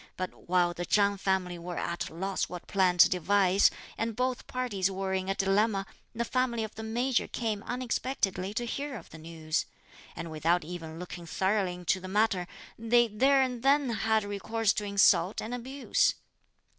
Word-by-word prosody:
But 185 -1 -6
while 175 -1 +3
the 175 - -4
Chang 200 +3 +3
family 185 -2 -1
were 175 +1 -6
at 170 - -3
a - - -13
loss 190 +2 -2
what 180 -1 -7
plan 185 -2 +2
to - - +9
devise, 190 +2 +3 0.3
and 225 -1 -1
both 255 +1 -1
parties 220 -7 -1
were 190 0 -3
in 190 0 -1
a 195 - +1
dilemma, 195 +1 +1 0.3
the 235 +1 -1
family 250 -3 0
of 220 - -6
the 220 - -8
Major 240 +3 0
came 220 -4 -2
unexpectedly 235 -6 -2
to 240 - -1
hear 275 +3 -4
of - - -13
the 160 - -11
news; 160 -1 -3 0.5
and 165 -1 -6
without 165 +3 +1
even 165 -1 -7
looking 175 -1 -8
thoroughly 190 +1 0
into 180 +1 0
the 185 - -8
matter, 195 -2 +1 0.3
they 235 +1 +3
there 265 +6 +4
and 250 -2 -3
then 275 -1 +3
had 220 0 +1
recourse 205 +2 0
to 210 - -3
insult 200 -1 +4
and 225 - -5
abuse. 260 +3 0
200 Hz, 180 wpm, -29 LUFS, 180-230 Hz, 0.5 s, to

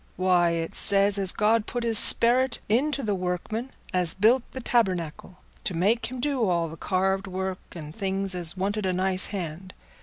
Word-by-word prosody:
Why, 180 -1 +2
it 165 -1 -3
says 200 0 +3
as 190 -2 +2
God 220 +1 +1
put 245 -1 -3
his 230 -2 +2
sperrit 250 +2 +4
into 275 +6 0
the 210 -3 -1
workman 185 +6 -3 0.2
as 180 -2 0
built 225 +6 +4
the 260 - -7
tabernacle, 185 -8 -1 0.3
to 180 - -3
make 205 +8 +1
him 255 0 -7
do 260 -6 0
all 170 -2 0
the 160 - -9
carved 190 +3 -1
work 190 0 -4
and 155 -2 -9
things 195 -1 -1
as 175 0 -3
wanted 200 +1 -2
a 185 - 0
nice 185 0 +1
hand. 185 -1 -7
190 Hz, 180 wpm, -25 LUFS, 180-225 Hz, 0.3 s, sperrit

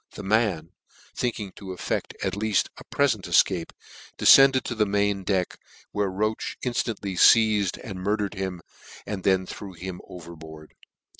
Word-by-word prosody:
The - - -7
man, 95 -6 0 0.4
thinking 110 -5 -3
to 100 - -11
effecl: 95 -1 -4
at 95 - -1
leaft 105 0 0
a - - -11
prefent - - 0
efcape, 90 -4 +2 0.5
defcended 135 -1 +7
to - - -4
the 110 -2 +1
main 100 -1 0
deck, 95 -2 -1 0.3
where 105 -1 -1
Roache 110 +3 -2
in 125 - -1
ftantly 100 -6 -3
feized, 110 -4 +5
and 95 -3 -8
murdered 105 +1 -1
him, 95 -3 -5 0.4
and 100 -3 -5
then 95 -1 +2
threw 95 +1 -8
him 90 +1 -7
overboard. 80 -3 -11
100 Hz, 150 wpm, -25 LUFS, 90-105 Hz, 0.5 s, defcended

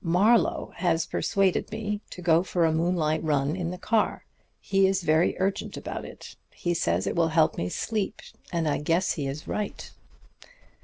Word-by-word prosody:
Marlowe 195 +4 +3
has 165 -2 +1
persuaded 195 -2 0
me 210 -1 -3
to 180 - -9
go 165 -1 +4
for 175 -2 +1
a 160 - +2
moonlight 160 -1 +1
run 145 -1 +1
in 175 -3 -3
the 180 - -5
car. 220 +3 0 0.3
He 195 -1 +2
is 195 -1 0
very 160 +2 +3
urgent 195 +1 -2
about - - -5
it. - - -11
He 175 - -2
says 90 - 0
it - - -2
will 170 -1 +3
help 160 -1 +3
me - - -2
to - - -2
sleep, 210 - -2 0.3
and 170 -2 0
I 150 - +1
guess 165 +5 +1
he 145 -4 -2
is 140 +3 -6
right.' 210 -1 -4
170 Hz, 185 wpm, -26 LUFS, 160-190 Hz, 0.3 s, go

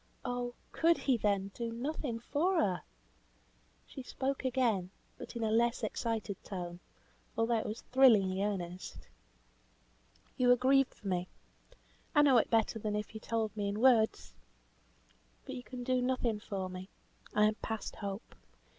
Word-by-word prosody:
Oh! 245 -1 -2 0.2
could 335 +1 +3
he, 265 - +2
then, 200 -3 0
do 235 -1 -4
nothing 250 0 -3
for 325 +10 +1
her! 185 - +1 1.0
She 270 - -8
spoke 265 +2 -3
again, 240 -8 +1 0.3
but - - -9
in 235 - -2
a 220 - +1
less 235 +2 +2
excited 220 -2 -2
tone, 175 -2 -6 0.6
although 225 0 +2
it - - -4
was 215 +2 -5
thrillingly 210 -8 +5
earnest. 180 - -4 1.3
"You 250 -2 +3
are 245 - +8
grieved 265 +2 +3
for 200 - -10
me! 180 -1 0 0.9
I 295 - +7
know 265 -4 +6
it - - 0
better 225 0 +2
than 210 -1 -2
if 210 +1 -4
you 220 - -6
told 220 -2 -2
me 205 -1 -1
in 205 +1 -3
words. 230 - +3 1.1
But - - -6
you 250 - -5
can 250 0 -7
do 255 0 +1
nothing 245 -4 0
for 195 -3 -4
me. 185 +1 -8 0.5
I 210 - +5
am 215 - +3
past 220 -1 -4
hope. 200 +2 -6
225 Hz, 155 wpm, -33 LUFS, 205-250 Hz, 1.3 s, are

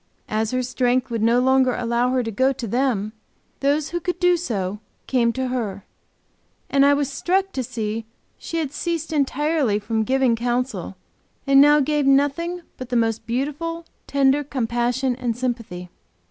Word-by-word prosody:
As 215 0 0
her 255 +1 -1
strength 250 0 0
would 230 -2 -1
no 230 +2 +4
longer 260 0 +3
allow 240 +1 0
her 255 -1 +1
to 225 - -4
go 260 +6 +2
to 250 -3 -5
them, 225 -3 0 0.5
those 285 +2 +1
who 345 - -2
could 355 +1 -3
do 355 0 +4
so 210 - -3 0.3
came 240 -3 +2
to 260 0 -2
her, 210 -6 -3 0.9
and 275 0 +4
I 285 0 +5
was 285 -1 0
struck 380 +7 0
to 260 - -3
see 225 -2 -4 0.3
she 330 - -5
had 300 -4 -2
ceased 330 0 -3
entirely 290 -4 +1
from 220 +2 -1
giving 260 +1 +2
counsel, 245 +3 -2 0.5
and 275 0 +6
now 295 +1 +6
gave 295 0 +1
nothing 290 +6 +1
but 255 -1 -7
the 250 - -1
most 225 -1 0
beautiful, 300 +7 -3 0.2
tender 280 +1 +3
compassion 245 -1 -1
and 240 -3 -2
sympathy. 230 -8 -4
255 Hz, 165 wpm, -22 LUFS, 235-285 Hz, 0.9 s, and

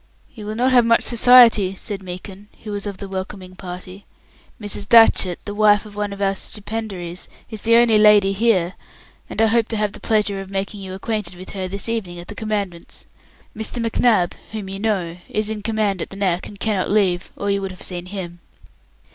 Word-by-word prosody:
"You 215 -4 -9
will 215 - -4
not 250 +3 +2
have 245 -2 +6
much 230 0 +3
society," 235 -5 +6
said 200 0 -3
Meekin, 190 +2 -9 0.2
who 210 - -6
was 205 0 -3
of 200 -2 -5
the 200 - -7
welcoming 190 -1 -6
party. 185 +1 -9 0.5
"Mrs. 205 -1 -5
Datchett, 225 -6 +6
the 205 - -5
wife 210 0 +4
of 210 -1 -12
one 205 -1 -2
of 200 - -7
our 195 0 +2
stipendiaries, 195 -4 -5 0.2
is 220 -2 -6
the 230 +1 +4
only 230 -2 +5
lady 210 -2 +6
here, 195 -4 +2 0.6
and - - -6
I 225 - +5
hope 225 0 +2
to 225 - -2
have 210 -1 0
the - - -8
pleasure 210 -3 0
of 195 - -10
making 195 +1 -4
you 190 -1 -6
acquainted 205 -3 -3
with 185 +1 -9
her 190 -2 -4
this 200 +4 -5
evening 210 -7 -3
at 175 - -10
the - - -5
Commandant's. 205 -5 -4 0.5
Mr. 220 +3 -4
McNab, 230 -5 +2 0.2
whom 210 -3 -5
you 195 0 -6
know, 190 -6 -1
is 215 0 -1
in 215 -1 -4
command 210 -4 -1
at - - -4
the - - -10
Neck, 185 -3 -1
and 205 - -12
cannot 210 -4 0
leave, 190 -4 +1
or 200 0 -2
you 200 0 0
would 195 - -3
have 185 -1 -11
seen 180 -1 -6
him." 180 -3 -6
205 Hz, 205 wpm, -21 LUFS, 190-220 Hz, 0.6 s, have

